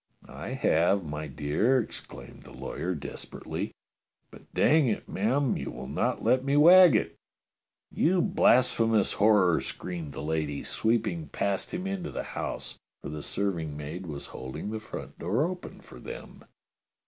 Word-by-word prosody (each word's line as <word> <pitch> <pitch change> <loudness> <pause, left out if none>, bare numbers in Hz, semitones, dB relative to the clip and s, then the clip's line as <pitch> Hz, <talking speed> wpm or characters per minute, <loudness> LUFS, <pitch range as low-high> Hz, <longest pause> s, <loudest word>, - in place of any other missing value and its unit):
"I - - -6
have, 90 +4 +2
my 75 0 -5
dear," 75 - +1
exclaimed 115 - -8
the - - -14
lawyer 90 +1 -4
desper 75 - -8
ately, - - -3 0.6
"but - - -16
dang 155 -2 +4
it, 110 - -2
ma'am, 125 +6 +1
you - - -4
will 65 - -7
not 70 - -1
let 130 0 +3
me 140 +1 +2
wag 175 -1 +8
it." - - 0 0.8
"You 180 +3 +2
blasphemous 125 - +3
horror!" 100 -5 +4
screamed 85 -5 -5
the - - -6
lady, 75 -2 -2
sweeping 115 +8 0
past 100 -1 -2
him 180 +1 -4
into 195 -3 -3
the - - -4
house, - - -5 0.2
for - - -5
the 75 0 -5
serving 85 -5 -2
maid 80 +5 -6
was 70 -3 -6
holding 65 +10 -6
the 110 - -3
front 110 - -9
door 105 - +1
open 180 +1 -6
for - - -13
them. 470 +2 -9
105 Hz, 155 wpm, -28 LUFS, -, 0.8 s, wag